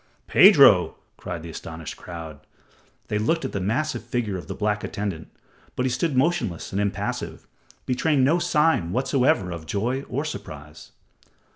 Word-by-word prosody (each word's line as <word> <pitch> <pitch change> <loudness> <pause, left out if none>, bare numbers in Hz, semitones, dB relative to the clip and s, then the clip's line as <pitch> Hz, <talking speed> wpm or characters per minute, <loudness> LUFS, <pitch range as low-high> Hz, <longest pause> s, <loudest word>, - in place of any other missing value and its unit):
"Pedro!" - - +7 0.2
cried 85 -2 -6
the 85 - -7
astonished 80 0 -7
crowd. 80 -4 -9 0.7
They 105 - -1
looked 165 +10 0
at - - -3
the 100 - -3
massive 115 +10 -1
figure 120 -4 -2
of 90 - -7
the - - -5
black 105 -1 -1
attendant, 100 -6 -4 0.5
but 125 - -1
he 130 - 0
stood 150 +1 -1
motionless 135 - 0
and 100 - -1
impassive, 100 -1 -3 0.4
betraying 135 +2 +1
no 155 +7 +3
sign 150 - +2
whatsoever 125 -7 +1
of 85 -2 -7
joy 120 +9 -1
or 140 +5 -2
surprise. 75 - -9
105 Hz, 150 wpm, -24 LUFS, 85-135 Hz, 0.7 s, Pedro